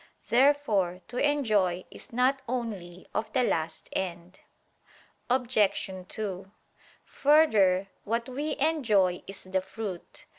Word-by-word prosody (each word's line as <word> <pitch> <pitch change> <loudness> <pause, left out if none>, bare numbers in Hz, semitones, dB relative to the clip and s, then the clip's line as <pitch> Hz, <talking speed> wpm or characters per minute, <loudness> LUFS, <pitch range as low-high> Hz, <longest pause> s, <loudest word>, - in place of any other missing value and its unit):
Therefore 235 -9 +3
to 245 - -6
enjoy 215 -12 +2
is - - -12
not 255 +3 +2
only 200 -8 -4
of 215 0 -2
the 255 - +3
last 160 -6 -1
end. 175 -1 -4 0.9
Obj. 240 -6 +2 0.2
2: 195 -3 -5 0.5
Further, 215 -11 +4 0.2
what 230 +2 -1
we 285 +4 -3
enjoy 225 - +2
is 195 - -7
the 190 0 -1
fruit. 190 -2 -7
215 Hz, 110 wpm, -28 LUFS, 185-255 Hz, 0.9 s, Further